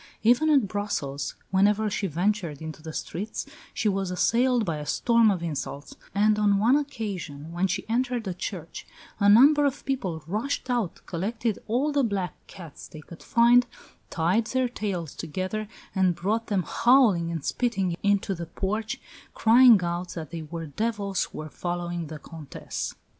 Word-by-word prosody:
Even 245 Hz, +8 st, +4 dB
at 275 Hz, -8 st, +4 dB
Brussels, 185 Hz, -9 st, -3 dB, 0.2 s
whenever 205 Hz, +3 st, +3 dB
she 200 Hz, -1 st, -1 dB
ventured 175 Hz, -2 st, -1 dB
into 160 Hz, 0 st, -7 dB
the 160 Hz, 0 st, -7 dB
streets 200 Hz, +7 st, -4 dB, 0.3 s
she 220 Hz, -, -1 dB
was 195 Hz, -2 st, 0 dB
assailed 235 Hz, +6 st, +2 dB
by 165 Hz, -4 st, -2 dB
a 150 Hz, -, -6 dB
storm 230 Hz, +7 st, +3 dB
of 185 Hz, -4 st, -1 dB
insults; 145 Hz, -3 st, -5 dB, 0.2 s
and 210 Hz, +1 st, +3 dB
on 205 Hz, -1 st, +3 dB
one 230 Hz, +6 st, +4 dB
occasion, 195 Hz, -, -4 dB
when 175 Hz, +3 st, 0 dB
she 190 Hz, -, -3 dB
entered 240 Hz, -1 st, -1 dB
a 185 Hz, -, -2 dB
church, 175 Hz, -2 st, -6 dB, 0.3 s
"a 200 Hz, -1 st, +4 dB
number 285 Hz, +8 st, +7 dB
of 280 Hz, -1 st, -1 dB
people 190 Hz, -, -2 dB
rushed 225 Hz, -, -2 dB
out, 235 Hz, -8 st, -1 dB
collected 215 Hz, +5 st, -2 dB
all 255 Hz, +7 st, +1 dB
the 285 Hz, -1 st, +2 dB
black 200 Hz, -6 st, -1 dB
cats 165 Hz, -6 st, -11 dB
they 155 Hz, -, -11 dB
could 165 Hz, +2 st, -13 dB
find, 240 Hz, +1 st, +4 dB, 0.4 s
tied 185 Hz, +7 st, +1 dB
their 260 Hz, 0 st, +1 dB
tails 195 Hz, -, -4 dB
together, 185 Hz, +6 st, -4 dB, 0.3 s
and 185 Hz, -3 st, +2 dB
brought 215 Hz, +7 st, -1 dB
them 200 Hz, -4 st, 0 dB
howling 230 Hz, -, +4 dB
and 165 Hz, -4 st, -4 dB
spitting 195 Hz, -8 st, 0 dB
into 200 Hz, -1 st, +1 dB
the 170 Hz, -2 st, -6 dB
porch, 215 Hz, +8 st, -3 dB, 0.4 s
crying 235 Hz, -1 st, +7 dB
out 175 Hz, +1 st, -3 dB
that 160 Hz, -4 st, -6 dB
they 165 Hz, -, -5 dB
were 165 Hz, +1 st, -6 dB
devils 200 Hz, +3 st, -1 dB
who -, -, -12 dB
were 155 Hz, -, -5 dB
following 175 Hz, +1 st, -4 dB
the 155 Hz, 0 st, -7 dB
Comtesse." 155 Hz, -1 st, -6 dB
200 Hz, 165 wpm, -26 LUFS, 170-230 Hz, 0.4 s, number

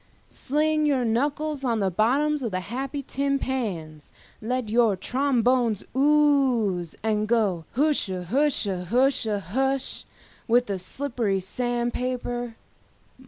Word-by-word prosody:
Sling 305 Hz, +2 st, 0 dB
your 265 Hz, -4 st, +1 dB
knuckles 285 Hz, +5 st, -1 dB
on 235 Hz, -3 st, +1 dB
the 195 Hz, -2 st, 0 dB
bottoms 275 Hz, -, +1 dB
of 235 Hz, -, -2 dB
the 185 Hz, -2 st, -2 dB
happy 265 Hz, -, -4 dB
tin 275 Hz, +1 st, 0 dB
pans, 180 Hz, -, -4 dB, 0.3 s
let 250 Hz, +1 st, -2 dB
your 225 Hz, -1 st, +3 dB
trombones 245 Hz, -1 st, +1 dB
ooze, 265 Hz, -, +2 dB
and 215 Hz, -1 st, 0 dB
go 205 Hz, -8 st, +1 dB
hushahusha 230 Hz, -, +1 dB
hush 270 Hz, +1 st, -1 dB, 0.4 s
with 245 Hz, +1 st, +4 dB
the 200 Hz, -4 st, -3 dB
slippery 230 Hz, -1 st, -2 dB
sand 240 Hz, +5 st, -2 dB
paper. 245 Hz, -2 st, -3 dB
245 Hz, 110 wpm, -25 LUFS, 210-275 Hz, 0.4 s, with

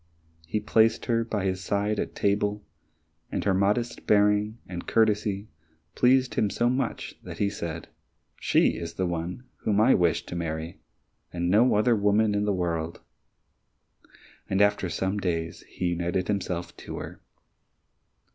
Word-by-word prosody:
He 105 Hz, -, -1 dB
placed 110 Hz, +1 st, +3 dB
her 115 Hz, -1 st, +1 dB
by 105 Hz, -4 st, -2 dB
his 95 Hz, 0 st, -1 dB
side 100 Hz, +2 st, 0 dB
at -, -, -3 dB
table, 105 Hz, +1 st, 0 dB, 0.7 s
and -, -, -2 dB
her 100 Hz, -, +2 dB
modest 105 Hz, +5 st, 0 dB
bearing 105 Hz, +1 st, +3 dB
and 90 Hz, -2 st, -7 dB
courtesy 105 Hz, -2 st, +1 dB, 0.5 s
pleased 130 Hz, +1 st, +3 dB
him 105 Hz, -, +1 dB
so 120 Hz, +4 st, +1 dB
much 130 Hz, -2 st, -2 dB
that -, -, -9 dB
he 100 Hz, -1 st, +1 dB
said, 85 Hz, -5 st, -5 dB, 0.5 s
"She -, -, +3 dB
is 85 Hz, -1 st, -6 dB
the 95 Hz, -, 0 dB
one 85 Hz, +5 st, -3 dB
whom 105 Hz, -1 st, 0 dB
I 115 Hz, +5 st, +6 dB
wish 85 Hz, -3 st, +2 dB
to -, -, -7 dB
marry, 80 Hz, 0 st, -4 dB, 0.5 s
and 85 Hz, 0 st, -1 dB
no 115 Hz, +5 st, +5 dB
other 115 Hz, +3 st, +4 dB
woman 105 Hz, +1 st, +3 dB
in 105 Hz, 0 st, 0 dB
the 105 Hz, -, +1 dB
world." 85 Hz, -3 st, -2 dB, 1.5 s
And 95 Hz, -, +1 dB
after 100 Hz, -2 st, +3 dB
some 95 Hz, +3 st, -1 dB
days 85 Hz, -3 st, -2 dB
he 90 Hz, -, -2 dB
united 85 Hz, +2 st, -1 dB
himself 90 Hz, -4 st, -2 dB
to -, -, -7 dB
her. -, -, -8 dB
100 Hz, 150 wpm, -27 LUFS, 90-105 Hz, 1.5 s, I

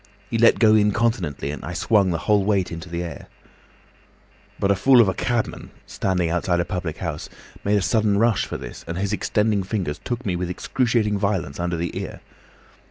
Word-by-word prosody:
He 115 Hz, -, 0 dB
let 115 Hz, -, +6 dB
go 110 Hz, -2 st, +5 dB
incontinently, 105 Hz, -, +1 dB
and 75 Hz, -, -7 dB
I 90 Hz, -, -5 dB
swung 100 Hz, +3 st, +2 dB
the 85 Hz, -, 0 dB
whole 105 Hz, -2 st, +3 dB
weight 100 Hz, -2 st, +1 dB
into 85 Hz, +1 st, -7 dB
the 85 Hz, +1 st, -3 dB
air. 85 Hz, -, -8 dB, 1.3 s
"But 100 Hz, -, +2 dB
a -, -, +3 dB
fool 130 Hz, +6 st, +5 dB
of 115 Hz, -, +6 dB
a 95 Hz, -, +1 dB
cabman, 120 Hz, +4 st, -2 dB, 0.2 s
standing 90 Hz, -3 st, -1 dB
outside 85 Hz, +1 st, 0 dB
a 85 Hz, -, 0 dB
public 90 Hz, -4 st, -4 dB
house, -, -, -5 dB, 0.3 s
made 105 Hz, +1 st, +2 dB
a 100 Hz, -, 0 dB
sudden 105 Hz, -2 st, +2 dB
rush 115 Hz, +1 st, +2 dB
for -, -, -4 dB
this, 65 Hz, -2 st, -9 dB
and 85 Hz, +1 st, -4 dB
his 100 Hz, +2 st, -1 dB
extending 105 Hz, -1 st, +1 dB
fingers 95 Hz, -6 st, -3 dB
took 120 Hz, +1 st, -4 dB
me 90 Hz, -, 0 dB
with 90 Hz, 0 st, -3 dB
excruciating 110 Hz, +1 st, 0 dB
violence 95 Hz, -8 st, -1 dB
under 85 Hz, 0 st, -1 dB
the 85 Hz, 0 st, -3 dB
ear. -, -, -7 dB
100 Hz, 195 wpm, -23 LUFS, 85-110 Hz, 1.3 s, let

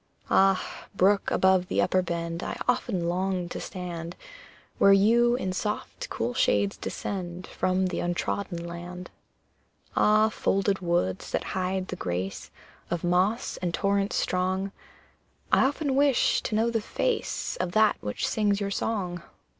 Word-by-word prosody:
Ah, 195 Hz, -1 st, +3 dB
brook 195 Hz, +2 st, +3 dB
above 190 Hz, -1 st, +3 dB
the -, -, -1 dB
upper 185 Hz, +1 st, +3 dB
bend, 170 Hz, -1 st, -3 dB
I -, -, -4 dB
often 180 Hz, -7 st, 0 dB
long 185 Hz, 0 st, -1 dB
to -, -, -5 dB
stand 175 Hz, -2 st, -6 dB, 0.6 s
Where 200 Hz, -, +7 dB
you 235 Hz, +5 st, +4 dB
in 190 Hz, -6 st, -2 dB
soft, 210 Hz, +2 st, -4 dB
cool 120 Hz, +2 st, -2 dB
shades 100 Hz, -3 st, +2 dB
descend 180 Hz, -2 st, -5 dB
From 185 Hz, +1 st, 0 dB
the 180 Hz, -1 st, -2 dB
untrodden 175 Hz, 0 st, -2 dB
land! 175 Hz, +1 st, -7 dB, 0.8 s
Ah, 215 Hz, +1 st, +4 dB
folded 195 Hz, -2 st, 0 dB
woods, 170 Hz, -, -1 dB
that -, -, -1 dB
hide 185 Hz, 0 st, -1 dB
the -, -, -3 dB
grace 90 Hz, -, -4 dB, 0.4 s
Of 175 Hz, 0 st, -2 dB
moss 185 Hz, +6 st, +1 dB
and 175 Hz, -2 st, -2 dB
torrents 200 Hz, 0 st, +1 dB
strong, 185 Hz, +2 st, 0 dB, 0.8 s
I -, -, +5 dB
often 285 Hz, 0 st, 0 dB
wish 280 Hz, -1 st, +3 dB
to 215 Hz, -, -1 dB
know 225 Hz, +2 st, +2 dB
the 225 Hz, -1 st, 0 dB
face 485 Hz, -, -2 dB
Of 180 Hz, -1 st, -2 dB
that 215 Hz, -1 st, +4 dB
which 105 Hz, -, -2 dB
sings 205 Hz, -2 st, +1 dB
your 200 Hz, -1 st, -2 dB
song! 185 Hz, -5 st, -2 dB
185 Hz, 145 wpm, -27 LUFS, 175-205 Hz, 0.8 s, Where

